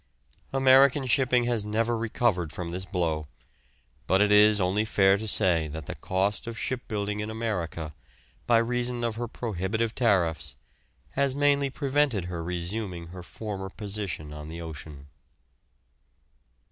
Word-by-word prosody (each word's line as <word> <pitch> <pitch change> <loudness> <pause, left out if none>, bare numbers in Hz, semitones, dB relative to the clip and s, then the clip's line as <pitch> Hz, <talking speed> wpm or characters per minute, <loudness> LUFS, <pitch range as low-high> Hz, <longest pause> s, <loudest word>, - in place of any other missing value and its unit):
American 135 +1 +5
shipping 125 -1 +3
has 120 -3 0
never 115 +3 0
recovered 110 -7 0
from 85 +1 -5
this 95 +2 -5
blow, 80 -5 -1 0.8
but 95 - +3
it 105 0 +4
is 105 0 +6
only 95 +3 +1
fair 95 -3 +4
to 110 +2 -4
say 85 -6 +3
that 80 0 -7
the - - -5
cost 100 +4 -1
of 115 -1 -5
shipbuilding 105 -5 -3
in 105 +1 -3
America, 90 -9 -3 0.5
by 120 - +5
reason 120 +1 0
of 115 -1 0
her 120 +2 -4
prohibitive 110 0 -2
tariffs, 95 -10 +1 0.6
has 140 -1 +1
mainly 140 -1 +3
prevented 140 - +1
her 85 -2 -4
resuming 90 0 -4
her 90 +1 -9
former 95 +1 -6
position 100 -8 -5
on 75 0 -8
the 85 +1 -7
ocean. 75 -3 -8
105 Hz, 140 wpm, -27 LUFS, 90-120 Hz, 0.8 s, is